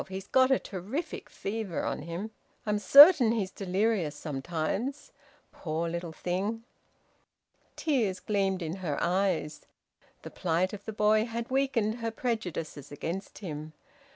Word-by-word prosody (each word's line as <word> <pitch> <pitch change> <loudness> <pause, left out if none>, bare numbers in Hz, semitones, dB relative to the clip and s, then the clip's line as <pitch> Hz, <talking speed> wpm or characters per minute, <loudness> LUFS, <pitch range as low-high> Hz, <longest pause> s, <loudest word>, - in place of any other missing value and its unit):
He's 190 0 -6
got 260 +3 +4
a 265 - +5
terrific 210 - -5
fever 205 -4 -4
on - - -2
him. 170 +7 -5 0.3
I'm 210 -1 0
certain 275 - +9
he's 200 -5 -1
delirious 195 -4 0
sometimes. 170 - -3 0.4
Poor 165 0 -3
little 170 0 -4
thing!" 195 +7 -3 1.1
Tears 230 - 0
gleamed 195 -3 0
in 165 +3 -4
her 170 -6 -3
eyes. 175 -4 0 0.6
The - - -8
plight 180 +3 0
of 205 -1 -8
the 220 - -4
boy 215 +1 +3
had 235 +2 -5
weakened 250 -5 +1
her 230 0 -2
prejudices 180 - -4
against 170 +7 -5
him. 155 -1 -6
195 Hz, 130 wpm, -29 LUFS, 170-225 Hz, 1.1 s, certain